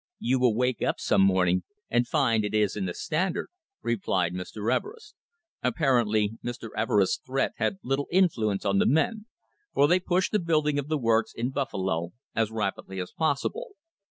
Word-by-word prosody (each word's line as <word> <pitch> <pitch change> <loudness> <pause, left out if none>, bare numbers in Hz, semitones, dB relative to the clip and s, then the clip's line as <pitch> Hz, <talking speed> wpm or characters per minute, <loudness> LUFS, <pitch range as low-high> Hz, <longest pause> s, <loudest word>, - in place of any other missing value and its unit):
"You 130 +2 +1
will 125 -4 +3
wake 125 +1 0
up - - 0
some 100 - +2
morning 90 -2 +3 0.3
and 120 0 +1
find 115 -7 +2
it 105 +1 -2
is 105 -2 +2
in 100 -3 -2
the 90 - -3
Standard," 175 +3 -1 0.3
replied 95 -6 0
Mr. 100 +5 -2
Everest. 450 +2 -6 0.5
Apparently 115 - +1
Mr. 120 -1 -5
Everest's 105 -3 +2
threat 135 +1 0
had 195 - 0
little 135 +2 -1
influence 115 - +2
on 100 -1 +2
the - - +3
men, 210 - +1 0.5
for 145 - +5
they 180 +4 +4
pushed 185 +1 0
the 210 - +2
building 155 -4 +1
of 140 - -4
the 155 0 0
works 115 -3 +1
in 120 +3 -2
Buffalo 95 - -2 0.2
as 110 -2 +1
rapidly 100 -3 -3
as 90 - -5
possible. 280 - -2
120 Hz, 170 wpm, -27 LUFS, 105-150 Hz, 0.5 s, for